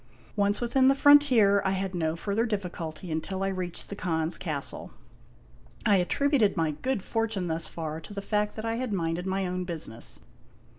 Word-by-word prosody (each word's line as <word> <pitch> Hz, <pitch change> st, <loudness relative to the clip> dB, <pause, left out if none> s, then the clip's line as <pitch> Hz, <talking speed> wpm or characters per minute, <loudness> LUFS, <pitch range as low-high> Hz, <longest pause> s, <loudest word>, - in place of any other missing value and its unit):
Once 205 Hz, 0 st, +1 dB
within 260 Hz, +2 st, +3 dB
the 270 Hz, -, +5 dB
frontier, 260 Hz, -9 st, +6 dB
I 190 Hz, -, +1 dB
had 190 Hz, 0 st, -2 dB
no 160 Hz, -2 st, 0 dB
further 205 Hz, +7 st, -1 dB
difficulty 180 Hz, -5 st, -4 dB
until 190 Hz, +5 st, -2 dB
I 195 Hz, -, +1 dB
reached 185 Hz, -2 st, -4 dB
the 200 Hz, -, -5 dB
Khan's 165 Hz, -4 st, -1 dB
castle. 150 Hz, -6 st, -3 dB, 0.9 s
I 205 Hz, -2 st, +5 dB
attributed 225 Hz, +3 st, +2 dB
my 160 Hz, -2 st, +2 dB
good 245 Hz, -, -2 dB
fortune 225 Hz, -5 st, -1 dB
thus 165 Hz, 0 st, 0 dB
far 160 Hz, -1 st, -5 dB
to 160 Hz, -, -12 dB
the -, -, -2 dB
fact 210 Hz, 0 st, 0 dB
that 220 Hz, -, -5 dB
I 225 Hz, 0 st, -1 dB
had 250 Hz, -3 st, -2 dB
minded 170 Hz, 0 st, -1 dB
my 190 Hz, 0 st, 0 dB
own 180 Hz, 0 st, -2 dB
business. 160 Hz, -10 st, -5 dB
190 Hz, 180 wpm, -28 LUFS, 165-220 Hz, 0.9 s, frontier